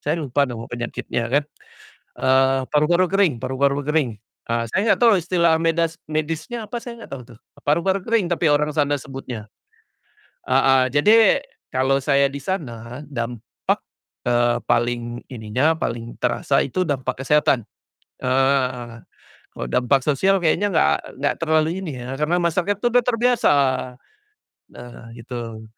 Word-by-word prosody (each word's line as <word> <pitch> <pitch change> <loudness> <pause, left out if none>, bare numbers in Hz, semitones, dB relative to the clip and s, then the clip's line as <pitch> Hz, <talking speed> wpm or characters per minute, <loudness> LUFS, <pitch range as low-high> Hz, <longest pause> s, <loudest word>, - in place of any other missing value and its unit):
saya 150 +3 -1
lupa 140 0 +1
nama 115 -2 -6
penyakitnya 120 0 -3
kan, 140 +4 +2 0.8
eee, 130 0 +3
paru-paru 170 +5 +3
kering 195 -5 +2
paru-paru 140 +3 0
kering, 150 -4 +1 0.4
ah, 115 0 0
saya 200 - 0
nggak - - +4
tahu 230 -3 +5
istilah 170 -1 +2
medas 165 0 +1 0.2
medisnya 160 +9 -3
apa 235 +3 -5
saya 235 -1 -8
nggak - - -14
tahu 130 - -8
tuh, - - -24 0.2
paru-paru 180 +6 +1
kering 225 -2 +1
tapi 170 -1 +1
orang 150 +1 +2
sana 145 -1 +1
sebutnya. 130 -6 -8 1.0
Heeh, 135 0 +4
jadi 220 - +5 0.3
kalau 130 +1 +2
saya 140 0 +2
di 140 - -5
sana 125 - -5
dampak, 120 -3 -3 0.4
eee, 120 0 +2
paling 120 0 -1
ininya 125 +6 0
paling 115 -6 -4
terasa 125 +3 +1
itu 140 +7 -3
dampak 130 -3 -2
kesehatan, 140 -6 +2 0.6
eee, 125 -3 0 0.5
kalau - - -4
dampak 130 +1 +2
sosial 190 +7 +3
kayaknya 180 +4 +1
nggak 70 - +1
nggak - - 0
terlalu 160 +2 +1
ini 155 -8 -5
ya, 130 - -5
karena 155 +3 +1
masyarakat 175 +3 0
itu 225 - -2
udah 245 0 +5
terbiasa, 245 -3 +3 1.2
nah 120 0 -11
gitu. 115 -2 -7
140 Hz, 140 wpm, -22 LUFS, 125-170 Hz, 1.2 s, tahu